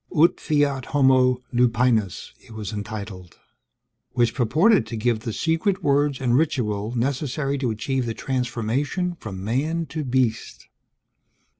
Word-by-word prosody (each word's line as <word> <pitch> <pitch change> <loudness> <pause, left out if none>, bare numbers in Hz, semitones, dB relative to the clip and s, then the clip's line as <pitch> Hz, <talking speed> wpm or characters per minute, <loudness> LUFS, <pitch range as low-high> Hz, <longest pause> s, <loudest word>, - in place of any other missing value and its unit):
Ut 165 +3 +4
Fiat 145 -4 0
Homo 130 -3 +3
Lupinus 120 -5 +1
it 115 - -15
was 110 -1 -6
entitled, 100 -4 -7 0.8
which 120 -2 +2
purported 155 - +3
to 115 - -5
give 115 0 +1
the 115 +1 -5
secret 170 - 0
words 145 -1 +2
and 125 -2 +1
ritual 115 -7 0
necessary 135 +2 -1
to 130 -3 0
achieve 125 +3 -2
the 115 - -3
transformation 130 - -2
from 95 -3 -7
man 150 +10 -1
to 155 -1 -5
beast. 125 -4 -1
125 Hz, 130 wpm, -23 LUFS, 110-145 Hz, 0.8 s, Ut